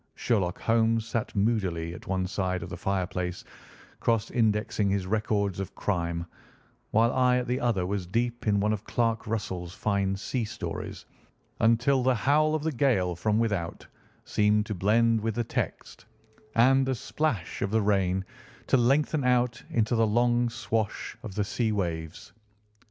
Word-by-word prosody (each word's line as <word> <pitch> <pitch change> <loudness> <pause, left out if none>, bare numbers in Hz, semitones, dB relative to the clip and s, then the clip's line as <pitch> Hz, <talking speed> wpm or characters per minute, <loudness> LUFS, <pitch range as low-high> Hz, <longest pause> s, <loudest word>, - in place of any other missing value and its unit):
Sherlock 95 -6 0
Holmes 115 0 +2
sat 115 -1 -3
moodily 95 -6 0
at - - -11
one 95 -1 0
side 95 -1 -2
of - - -7
the - - -5
fireplace 90 -2 -2 0.6
cross 115 -2 0
indexing 105 -2 +1
his 95 -1 0
records 100 -2 0
of 95 - -5
crime, 85 -3 -1 0.6
while 115 +2 +3
I 125 -1 +3
at 125 - -1
the 125 +1 -1
other 110 -7 +1
was 95 -1 -3
deep 120 +4 -2
in 100 -1 +3
one 105 +2 +2
of 105 -1 -4
Clark 115 -2 -1
Russell's 95 -5 -3
fine 100 -2 0
sea 115 +5 -2
stories 110 +2 -6 0.5
until 120 +4 +3
the 130 0 +3
howl 155 +6 +3
of 155 - -2
the 160 - 0
gale 115 - +1
from 105 +5 0
without 105 -7 -1 0.4
seemed 105 0 +2
to 105 - -3
blend 110 +4 +3
with 110 0 -2
the 120 - 0
text, - - -4 0.5
and 130 +4 +5
the 130 - +1
splash 120 - -2
of 100 - 0
the 110 +1 +1
rain 95 -2 +1 0.4
to - - +3
lengthen 140 +4 +2
out 125 -1 +2
into 115 0 +1
the 115 -1 +3
long 120 +2 +2
swash 110 -2 -2
of 110 -7 -8
the 105 - +1
sea 110 +2 -1
waves. 90 +1 -4
110 Hz, 160 wpm, -28 LUFS, 95-120 Hz, 0.6 s, and